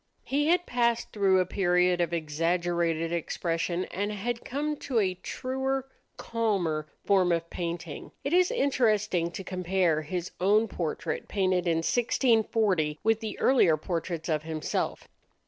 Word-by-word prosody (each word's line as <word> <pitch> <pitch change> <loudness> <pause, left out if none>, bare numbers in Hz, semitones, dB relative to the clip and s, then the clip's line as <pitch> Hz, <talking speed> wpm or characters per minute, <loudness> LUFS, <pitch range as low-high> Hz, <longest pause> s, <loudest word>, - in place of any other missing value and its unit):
He 290 +2 0
had 355 +2 +3
passed 235 -1 0
through 195 -3 +3
a 185 - +2
period 180 -1 +2
of 170 -1 0
exaggerated 165 +1 0
expression 170 +1 -1
and 205 +3 -2
had 230 +3 -3
come 300 +3 -2
to 265 -4 -3
a 190 -4 +2
truer, 265 +7 -3 0.3
calmer 190 -10 -1 0.2
form 190 -3 +3
of 170 0 -1
painting. 170 -3 -5
It 280 - -2
is 365 0 +5
interesting 215 - +1
to 185 +3 -7
compare 180 -3 0
his 175 +3 -4
own 210 +4 +3
portrait 165 -3 -3
painted 185 -3 +1
in 165 -1 +2
1640 220 - +2
with 225 0 +3
the 220 -2 -5
earlier 210 -12 +4
portraits 165 0 -3
of 155 -3 0
himself. 155 0 -3
185 Hz, 140 wpm, -28 LUFS, 170-225 Hz, 0.3 s, is